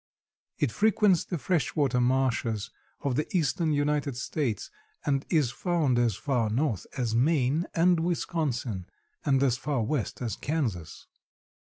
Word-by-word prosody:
It 140 Hz, -, +1 dB
frequents 205 Hz, -, +3 dB
the 175 Hz, -, -3 dB
fresh 165 Hz, +1 st, 0 dB
water 135 Hz, -5 st, +2 dB
marshes 120 Hz, -4 st, 0 dB, 0.3 s
of 140 Hz, -3 st, -1 dB
the 150 Hz, -, 0 dB
eastern 160 Hz, +1 st, +1 dB
United 145 Hz, -2 st, 0 dB
States 130 Hz, -3 st, -2 dB, 0.3 s
and 140 Hz, -2 st, 0 dB
is 150 Hz, -8 st, +2 dB
found 150 Hz, -3 st, +1 dB
as 120 Hz, -4 st, +2 dB
far 115 Hz, +2 st, 0 dB
north 115 Hz, -, -1 dB
as 120 Hz, -4 st, -1 dB
Maine 140 Hz, +4 st, +2 dB
and 175 Hz, 0 st, +4 dB
Wisconsin 145 Hz, -, -2 dB, 0.4 s
and 135 Hz, -1 st, +3 dB
as 130 Hz, -3 st, +2 dB
far 135 Hz, -5 st, -1 dB
west 120 Hz, 0 st, -2 dB
as 120 Hz, -3 st, -3 dB
Kansas. 115 Hz, -, -3 dB
140 Hz, 140 wpm, -28 LUFS, 120-155 Hz, 0.4 s, and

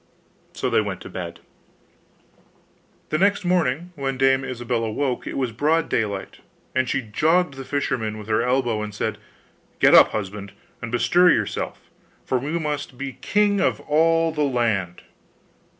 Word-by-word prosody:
So -, -, -2 dB
they -, -, +4 dB
went 100 Hz, -3 st, -4 dB
to -, -, -10 dB
bed. 85 Hz, -2 st, -7 dB, 1.7 s
The 155 Hz, -, 0 dB
next 200 Hz, 0 st, +2 dB
morning 175 Hz, -2 st, 0 dB
when 135 Hz, -3 st, -3 dB
Dame 135 Hz, 0 st, +3 dB
Ilsabill 120 Hz, -2 st, -2 dB
awoke 125 Hz, +4 st, -2 dB
it -, -, -4 dB
was 130 Hz, -3 st, -1 dB
broad 155 Hz, +8 st, +1 dB
daylight, 100 Hz, -3 st, -2 dB, 0.3 s
and 130 Hz, -1 st, +1 dB
she 135 Hz, +1 st, 0 dB
jogged 155 Hz, +9 st, +1 dB
the 135 Hz, 0 st, -8 dB
fisherman 125 Hz, -6 st, -2 dB
with 105 Hz, -1 st, -9 dB
her 110 Hz, 0 st, +2 dB
elbow, 120 Hz, -3 st, 0 dB
and 105 Hz, -1 st, -6 dB
said, -, -, -3 dB, 0.6 s
'Get -, -, +5 dB
up, -, -, +9 dB
husband, 100 Hz, -1 st, -5 dB, 0.3 s
and 120 Hz, -, -5 dB
bestir 175 Hz, +9 st, +4 dB
yourself, -, -, -1 dB, 0.4 s
for 130 Hz, -, 0 dB
we 150 Hz, +6 st, -2 dB
must 150 Hz, -4 st, -4 dB
be 135 Hz, -1 st, -6 dB
king 205 Hz, -1 st, +2 dB
of -, -, +1 dB
all 165 Hz, +2 st, +2 dB
the 155 Hz, -1 st, -3 dB
land. 115 Hz, -10 st, 0 dB
130 Hz, 155 wpm, -23 LUFS, 110-155 Hz, 1.7 s, up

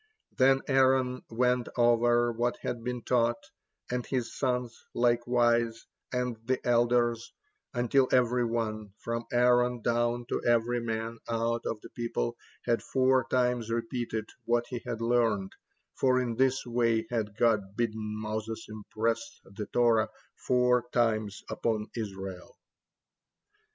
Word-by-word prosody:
Then 135 Hz, +1 st, +4 dB
Aaron 130 Hz, -1 st, +3 dB
went 125 Hz, +1 st, +1 dB
over 120 Hz, 0 st, +4 dB
what 120 Hz, +1 st, -1 dB
had 120 Hz, -1 st, -3 dB
been 125 Hz, -1 st, -4 dB
taught, 120 Hz, +2 st, 0 dB, 0.4 s
and 125 Hz, 0 st, -1 dB
his 125 Hz, -3 st, -3 dB
sons 125 Hz, -3 st, -1 dB, 0.2 s
likewise, 120 Hz, -1 st, +2 dB, 0.3 s
and 125 Hz, -2 st, -1 dB
the 130 Hz, +2 st, 0 dB
elders, 120 Hz, -1 st, +2 dB, 0.4 s
until 125 Hz, +2 st, +3 dB
every 125 Hz, -1 st, +3 dB
one, 110 Hz, -3 st, -2 dB
from 115 Hz, 0 st, -4 dB
Aaron 125 Hz, 0 st, +3 dB
down 120 Hz, +1 st, +1 dB
to -, -, -1 dB
every 120 Hz, +1 st, +2 dB
man 115 Hz, 0 st, -3 dB
out 115 Hz, 0 st, -1 dB
of 105 Hz, -, -3 dB
the -, -, -12 dB
people, 115 Hz, -, -2 dB, 0.3 s
had 120 Hz, -1 st, +1 dB
four 130 Hz, -1 st, +2 dB
times 125 Hz, -2 st, +1 dB
repeated 115 Hz, -1 st, -2 dB, 0.2 s
what 120 Hz, 0 st, +2 dB
he 120 Hz, -2 st, -4 dB
had 115 Hz, -, -3 dB
learned, 115 Hz, -5 st, +1 dB, 0.4 s
for 130 Hz, -1 st, +2 dB
in 125 Hz, -2 st, -1 dB
this 130 Hz, +1 st, +2 dB
way 115 Hz, -2 st, +1 dB
had 105 Hz, -3 st, -2 dB
God 105 Hz, -5 st, +2 dB
bidden 110 Hz, -2 st, -2 dB
Moses 110 Hz, +1 st, -4 dB
impress 110 Hz, +1 st, -2 dB, 0.2 s
the 100 Hz, +2 st, -7 dB
Torah 115 Hz, -2 st, +3 dB, 0.3 s
four 125 Hz, -1 st, +2 dB
times 110 Hz, -4 st, 0 dB
upon 110 Hz, -2 st, -1 dB
Israel. 95 Hz, -4 st, -6 dB
120 Hz, 130 wpm, -29 LUFS, 115-125 Hz, 0.4 s, Then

